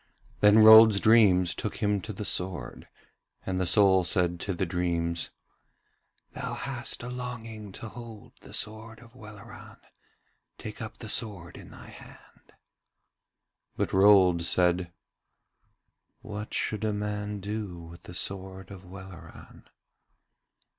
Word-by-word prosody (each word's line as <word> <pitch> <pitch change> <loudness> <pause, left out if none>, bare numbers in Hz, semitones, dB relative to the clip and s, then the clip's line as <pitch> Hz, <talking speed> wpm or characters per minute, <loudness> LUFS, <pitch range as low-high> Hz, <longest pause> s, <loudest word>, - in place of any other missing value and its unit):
Then 105 +1 +6
Rold's 110 -1 +9
dreams 100 -6 +4
took 105 - -5
him 105 -2 0
to 110 - -7
the 105 +1 -6
sword, 90 -11 -3 0.6
and 95 -1 -2
the 95 - 0
soul 95 -1 +4
said 85 0 0
to 95 - -3
the 95 - -1
dreams: 85 -1 -2 1.0
'Thou - - -5
hast - - -4
a - - -6
longing 115 -4 -7
to 110 - -8
hold 115 0 -11
the - - -14
sword 110 +1 -4
of 120 0 -17
Welleran: 105 -5 -13 0.8
take - - -9
up - - -7
the - - -9
sword 90 -5 -4
in - - -12
thy - - -13
hand.' - - -16 1.2
But - - -2
Rold 95 -3 +5
said: 90 0 +1 1.3
'What 105 0 -7
should 110 0 -2
a 110 -1 0
man 105 0 -4
do 100 -2 -5
with 85 +1 -12
the 90 - -11
sword 95 0 -5
of 95 -1 -11
Welleran?' 90 -3 -13
100 Hz, 130 wpm, -27 LUFS, 90-110 Hz, 1.3 s, Rold's